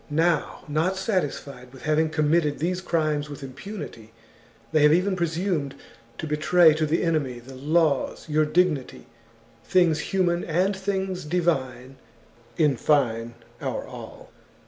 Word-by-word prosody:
Now, 160 +2 +1
not 160 +6 0
satisfied 145 - -3
with 130 - -14
having 155 +1 +2
committed 155 -1 +1
these 180 +5 -1
crimes 155 -4 0
with 145 -1 -8
impunity, 130 - -8 0.6
they 155 - +3
have 150 0 +6
even 185 +3 +2
presumed 170 -4 -1 0.4
to - - -5
betray 160 +2 +5
to 155 0 0
the 160 +3 +1
enemy 155 -7 0
the 125 +3 -12
laws, 150 +2 0
your 155 0 +2
dignity, 155 -3 0 0.6
things 170 -4 +3
human 175 0 0
and 185 +5 +1
things 190 -1 -2
divine, 135 -6 -1 0.6
in 150 -5 +3
fine, 120 -5 +1 0.3
our - - -3
all. - - -11
155 Hz, 130 wpm, -25 LUFS, 140-175 Hz, 0.6 s, have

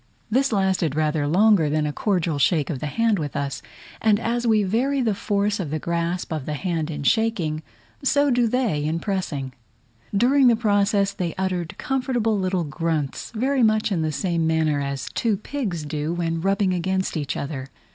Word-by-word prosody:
This 270 +3 +2
lasted 190 -7 +1
rather 155 -1 +1
longer 185 -1 +4
than 155 0 +1
a 150 - -2
cordial 175 -7 0
shake 155 +1 +2
of 140 - -4
the 150 - -3
hand 225 +5 +1
with 145 -3 -4
us, 140 -1 -3 0.4
and 215 -2 +3
as 240 +1 -1
we 215 -2 +4
vary 250 +8 +1
the 230 -5 +1
force 205 -1 0
of 175 -6 -3
the 155 - -1
grasp 170 +1 -2
of 155 -4 -4
the 150 - -2
hand 165 -2 -2
in 145 -2 -4
shaking, 175 -5 +1 0.4
so 285 +1 +3
do 240 -1 +3
they 220 - 0
in 160 +2 -1
pressing. 165 -10 -3 0.6
During 255 +6 +4
the 235 - +6
process 205 -2 +2
they 175 -4 -3
uttered 185 -3 -2
comfortable 250 -4 0
little 185 -1 0
grunts, 155 -1 -2
very 260 +4 +1
much 215 -1 +3
in 175 -4 +1
the 155 -1 0
same 165 +1 0
manner 160 -2 +1
as 140 -1 -3
two 220 -4 +1
pigs 200 - -4
do, 150 +2 -2
when 165 -1 -2
rubbing 195 0 +1
against 185 +1 -1
each 145 -3 -2
other. 140 -2 -4
185 Hz, 185 wpm, -23 LUFS, 155-220 Hz, 0.6 s, the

